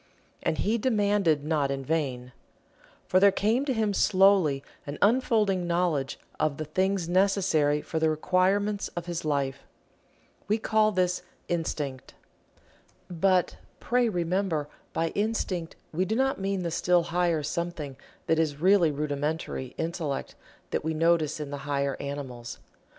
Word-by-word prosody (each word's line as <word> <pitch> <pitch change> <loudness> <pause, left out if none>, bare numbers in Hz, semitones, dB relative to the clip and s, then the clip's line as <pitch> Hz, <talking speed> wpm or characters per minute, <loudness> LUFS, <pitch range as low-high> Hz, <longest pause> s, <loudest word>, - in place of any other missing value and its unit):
And 155 - 0
he 225 +3 +1
demanded 205 - +2
not 150 -3 +1
in 135 -1 -3
vain. 130 -5 -2 0.7
For 185 - +3
there 200 +1 +6
came 220 +7 +1
to 270 - 0
him 220 -3 0
slowly 190 -8 +4 0.2
an 145 - -5
unfolding 210 -5 +2
knowledge 170 -7 0 0.2
of 155 -2 0
the 155 - -4
things 185 +3 0
necessary 175 -6 +2
for 160 - -3
the 160 0 +3
requirements 190 +6 +1
of 175 -1 -4
his 175 -1 -4
life. 140 -2 -1 0.9
We 210 +2 +2
call 215 -1 +2
this 180 -2 0 0.3
Instinct. 150 -6 -3 1.0
But, 180 +1 +2 0.2
pray 245 -1 +2
remember, 175 -4 -1 0.2
by 165 0 0
Instinct 200 -5 -2 0.2
we 175 +4 +1
do 220 - -1
not 265 0 +1
mean 195 -1 -1
the 170 - -2
still 175 +1 +2
higher 170 -2 0
something 155 -2 -4 0.3
that 160 - +2
is 150 -3 0
really 185 -1 +5
rudimentary 145 -2 -3
Intellect 160 -4 -3 0.4
that - - -1
we 160 0 -1
notice 160 -2 +2
in 145 -2 -5
the 145 - -3
higher 140 -1 0
animals. 130 -4 -6
170 Hz, 140 wpm, -27 LUFS, 150-195 Hz, 1.0 s, there